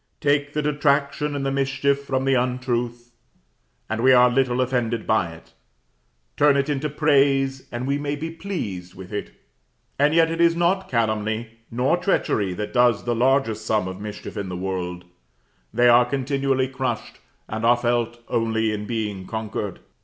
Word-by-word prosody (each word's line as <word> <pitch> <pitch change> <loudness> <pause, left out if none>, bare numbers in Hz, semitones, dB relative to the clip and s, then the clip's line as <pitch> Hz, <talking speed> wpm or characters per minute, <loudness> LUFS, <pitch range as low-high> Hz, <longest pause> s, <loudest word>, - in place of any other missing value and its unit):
Take 145 0 +1
the 150 - -1
detraction 145 0 +1
and 140 -1 -2
the 135 - 0
mischief 140 +1 0
from 130 -1 -1
the 135 - +3
untruth, 120 -1 -1 0.8
and 110 +1 -2
we 130 +1 +6
are 125 -1 +6
little 125 -1 +1
offended 120 -3 0
by 105 -6 +1
it; 80 - -15 0.8
turn 145 -1 +4
it 140 +1 0
into 145 +1 -1
praise, 135 -3 +2
and 120 +1 -4
we 140 +1 0
may 145 0 -2
be 160 +3 -5
pleased 105 - -5
with 95 +2 -10
it. 105 - -3 0.7
And 145 +2 +3
yet 165 -1 +4
it 165 0 -1
is 170 0 +5
not 175 +3 +1
calumny 110 0 -1
nor 125 +8 +1
treachery 110 - 0
that 105 +2 -5
does 120 -3 +3
the 120 - 0
largest 120 -3 +1
sum 110 -3 0
of 95 +1 -7
mischief 105 +1 -7
in 100 -2 -3
the 90 - -4
world; 90 -1 -4 0.7
they 120 +1 +3
are 120 0 +6
continually 135 0 0
crushed, 130 0 -4 0.3
and 110 +1 -4
are 120 +1 +5
felt 120 -1 -1
only 110 -1 0
in 105 -1 -4
being 105 -5 -3
conquered. 110 -3 -4
125 Hz, 170 wpm, -23 LUFS, 110-140 Hz, 0.8 s, we